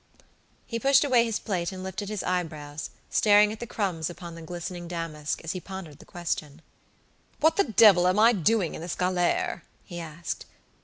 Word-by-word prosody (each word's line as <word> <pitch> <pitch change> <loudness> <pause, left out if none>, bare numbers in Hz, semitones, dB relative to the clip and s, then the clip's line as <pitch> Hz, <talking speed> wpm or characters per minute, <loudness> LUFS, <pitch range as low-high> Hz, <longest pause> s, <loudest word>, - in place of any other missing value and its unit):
He 230 - -4
pushed 275 +2 +5
away 250 -5 +4
his 225 -2 -1
plate 175 -5 -2
and 185 -1 -7
lifted 190 +2 -5
his 215 -2 -3
eyebrows, 155 -5 -3 0.2
staring 210 0 +5
at 215 - -7
the 240 - -6
crumbs 180 -8 -2
upon 175 -1 -9
the 165 - -10
glistening 175 +1 -6
damask, 165 -3 -4
as 165 - -3
he 185 - -4
pondered 190 -6 -9
the - - -14
question. 160 -3 -4 0.8
"What 320 +2 +4
the 400 - +3
devil 210 -7 +6
am 185 +2 +2
I 225 +3 +6
doing 200 -1 +1
in - - -7
this 170 +1 -4
galere?" 180 -1 0 0.2
he 175 - -8
asked. 165 0 -6
180 Hz, 185 wpm, -27 LUFS, 165-210 Hz, 0.8 s, devil